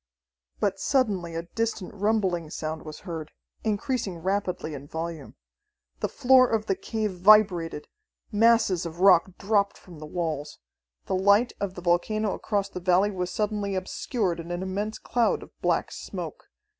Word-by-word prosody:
But 195 -1 0
suddenly 195 -11 0
a 165 - -2
distant 220 +2 -3
rumbling 195 -5 0
sound 155 0 -4
was 155 -1 -9
heard, 165 -4 -6 0.3
increasing 215 -3 -1
rapidly 185 -2 -2
in 140 0 -8
volume. 160 -2 -6 0.6
The - - -1
floor 255 0 +5
of 220 -1 0
the 195 - +1
cave 215 +1 -2
vibrated; 180 -5 +4 0.4
masses 220 -4 +4
of 165 +1 -9
rock 190 -1 +5
dropped 200 -1 +1
from 175 -4 -14
the 155 - -8
walls. 155 -3 -3 0.5
The - - -3
light 200 +5 +4
of 195 -2 -3
the 180 - -7
volcano 200 +4 +1
across 200 -2 -1
the 195 - -7
valley 185 +3 +3
was 180 -2 -3
suddenly 205 0 -1
obscured 185 0 -2
in 165 +1 -7
an 175 +1 -3
immense 205 +3 -3
cloud 235 -2 0
of - - -14
black - - +1
smoke. - - -7
190 Hz, 155 wpm, -26 LUFS, 170-215 Hz, 0.6 s, floor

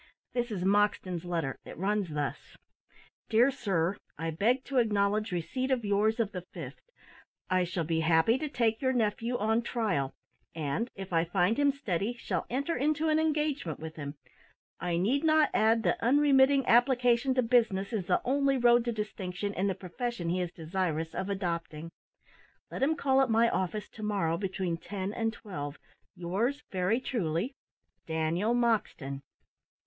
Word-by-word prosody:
"This 240 -1 -1
is 195 -5 -3
Moxton's 190 -3 +1
letter. 165 -6 -2
It - - -10
runs 200 +1 0
thus 145 -4 -4 0.7
"`Dear 245 +5 +4
Sir, 190 -6 0 0.2
I 165 0 -2
beg 235 +11 +1
to 270 -2 0
acknowledge 210 -1 +1
receipt 180 +10 -2
of 250 -4 0
yours 210 +3 +2
of 215 -3 0
the 180 - -5
5th 180 - -29
inst. 160 - -9 0.6
I 185 0 +3
shall 175 -1 -2
be 160 +1 0
happy 160 +9 +3
to 305 - -3
take 225 -4 0
your 260 -1 +2
nephew 230 +1 0
on 220 +2 +1
trial, 210 - -1 0.4
and, 160 - -2
if 190 -2 -7
I 165 0 +3
find 180 +7 +1
him 285 -1 +4
steady, 220 -4 -2
shall - - -3
enter 280 +7 -1
into 305 +4 +1
an 310 0 +3
engagement 300 - -1
with 160 0 -7
him, 145 -1 -6 0.6
I 175 -1 -1
need 245 - +1
not 310 -1 +4
add 225 +1 +3
that - - +1
unremitting 275 +1 +4
application 245 +1 +3
to 255 - +3
business 225 -4 +2
is 195 -5 -2
the 180 - +2
only 275 +1 +2
road 240 -1 +5
to 240 - 0
distinction 205 -2 -4
in 195 +1 0
the 190 - 0
profession 185 0 -4
he 180 +2 0
is 175 -2 -3
desirous 165 -1 -2
of 190 - -3
adopting. 170 -4 -3 0.8
Let - - -5
him 300 +4 +3
call 270 -2 +3
at 265 - +2
my 230 +1 +4
office 190 +3 -2
to 220 - -12
morrow 200 -6 0
between 185 -3 -2
ten 190 +3 -5
and 225 -1 0
twelve. 145 -11 -7 0.4
Yours 210 +11 -1
very 190 +5 +1
truly, 205 - -2 0.5
Daniel 165 +8 0
Moxton.'" 210 - 0
210 Hz, 165 wpm, -30 LUFS, 175-245 Hz, 0.8 s, road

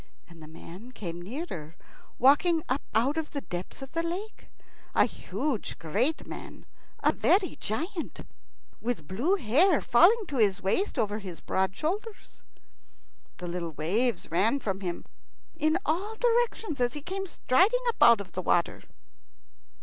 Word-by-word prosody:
And 170 -1 -15
the 155 - -10
man 180 +9 -11
came 175 -6 -6
nearer, 180 - -6 0.4
walking 310 +5 +4
up 260 +3 0
out 265 +7 +2
of 320 -1 -2
the 280 - -4
depths 180 +7 -7
of 270 - -9
the 330 +1 0
lake 365 +6 -5 0.5
a - - +6
huge, 280 -8 -3
great 220 - -1
man, - - -9 0.4
a - - +4
very 380 -2 +2
giant, 325 - -3 0.6
with 225 -11 -3
blue 260 - +1
hair 305 - +4
falling 400 - +5
to 280 - -3
his 205 -4 +3
waist 240 - 0
over 210 -2 0
his 185 -5 -8
broad 190 0 -1
shoulders. 410 - -4 1.0
The 180 - -7
little 170 -2 -4
waves 190 - -1
ran 220 +11 +3
from 195 -6 -2
him 180 -3 -4 0.5
in 310 +2 +2
all 390 +8 -1
directions 460 - +1
as 245 0 +2
he 295 - -5
came 385 +5 -4
striding 385 - +2
up 465 - -4
out 235 -2 +8
of 185 -2 -10
the 185 - -3
water. 175 -1 +1
255 Hz, 150 wpm, -28 LUFS, -, 1.0 s, out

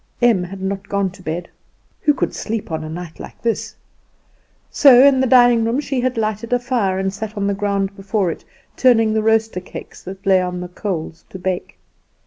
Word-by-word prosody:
Em 235 -7 +3
had 190 +1 -8
not 195 +1 -4
gone 200 -2 0
to 185 - -15
bed. 170 +1 -4 0.5
Who 295 -1 +3
could - - -1
sleep 220 -5 -4
on 160 0 -3
a 155 - -6
night 170 0 -8
like - - -10
this? 230 -1 -2 1.0
So 260 -3 +7
in 275 -2 +5
the 260 - +2
dining 245 -2 +5
room 230 +4 0
she 270 -3 -2
had 255 -1 -1
lighted 220 +1 -2
a 245 - +4
fire, 240 -7 -1
and 190 0 -1
sat 215 +1 -6
on 200 - -1
the 200 - +1
ground 200 -1 -1
before 195 -2 -1
it, - - -9 0.3
turning 225 -4 +4
the 220 - +1
roaster 220 -2 +1
cakes 180 - -10
that 195 +2 -9
lay 190 -1 +4
on 180 0 -3
the 180 0 -6
coals 170 -4 -5
to - - -8
bake. 185 0 -4
200 Hz, 205 wpm, -19 LUFS, 185-230 Hz, 1.0 s, So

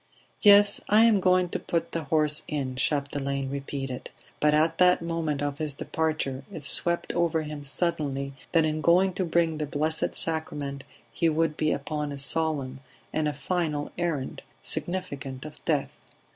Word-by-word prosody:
"Yes. 205 -1 +7
I 215 +2 +6
am 225 -3 +5
going 185 -1 +3
to - - -2
put 170 -2 -2
the 165 -2 -3
horse 150 +1 +2
in," 135 -4 -3
Chapdelaine 140 0 -1
repeated. 135 -2 -5 0.3
But 150 0 +4
at 160 +2 +2
the 180 0 +6
moment 165 -4 -2
of 145 -1 -3
his 150 -3 -2
departure 150 -4 -2
it 155 - -7
swept 170 +4 +1
over 165 -2 +1
him 150 -1 -6
suddenly 140 -3 -1 0.2
that 165 -2 +4
in 155 0 -1
going 180 +3 +4
to 185 - -1
bring 165 -2 +1
the 150 - -2
Blessed 155 +3 -1
Sacrament 145 -4 -2 0.3
he 165 - +1
would 160 0 +1
be 155 0 +1
upon 150 +1 -3
a 140 - -5
solemn 140 -2 -1 0.3
and 155 -1 +1
a - - +1
final 150 -1 -2
errand, 165 -6 -2 0.2
significant 140 -7 -4
of 150 - -10
death. 150 -4 0
155 Hz, 160 wpm, -27 LUFS, 140-170 Hz, 0.3 s, Yes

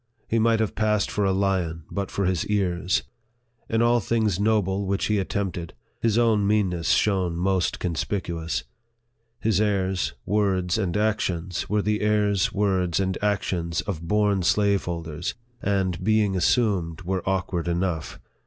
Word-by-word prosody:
He 115 - +1
might 115 0 +3
have 110 -2 0
passed 105 -1 +1
for 105 - 0
a 95 - +2
lion, 95 -4 0
but 100 -1 -3
for 100 - -1
his 90 -2 +1
ears. 95 -3 0 0.7
In 115 +1 +2
all 120 0 +4
things 110 -4 0
noble 100 -2 +1
which 100 +1 0
he 105 -1 +1
attempted, 95 -3 -3 0.3
his 115 -1 +2
own 110 -4 +3
meanness 95 -6 +1
shone 95 -5 +2
most 90 +1 0
conspicuous. 85 -1 -2 0.8
His 110 -2 +2
airs, 95 -3 0
words, 95 -3 +1
and 90 0 -1
actions, 95 -5 -1
were 105 -1 +1
the 105 0 0
airs, 105 -2 +2
words, 95 -4 +1
and 95 -1 0
actions 90 -5 -1
of 90 -6 -4
born 105 0 +2
slaveholders, 85 -4 0 0.3
and, 95 -3 0
being 105 -1 +2
assumed, 90 -4 +1
were 95 +1 -1
awkward 90 -2 -1
enough. 85 -2 -2
95 Hz, 145 wpm, -25 LUFS, 90-105 Hz, 0.8 s, all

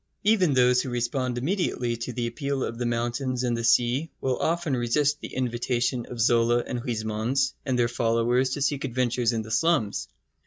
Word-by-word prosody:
Even 190 -9 +3
those 125 0 +4
who 130 - -5
respond 120 +1 -1
immediately 130 -5 -1
to 115 +2 -5
the 120 0 -3
appeal 140 +3 -2
of 115 - -4
the 120 - 0
mountains 120 +2 -1
and 120 -1 0
the 115 - -3
sea 120 +6 +2
will 130 -1 -1
often 165 -4 0
resist 140 +5 +1
the - - -8
invitation 120 0 -1
of 125 - -8
Zola 120 +1 +3
and 125 - -3
Huysmans 115 +2 -1
and 130 -2 +1
their 120 -1 +3
followers 120 +2 +1
to 145 - -1
seek 140 -1 0
adventures 125 -2 0
in 115 -2 -2
the 110 - -9
slums. 110 - +1
125 Hz, 185 wpm, -26 LUFS, 120-135 Hz, -, those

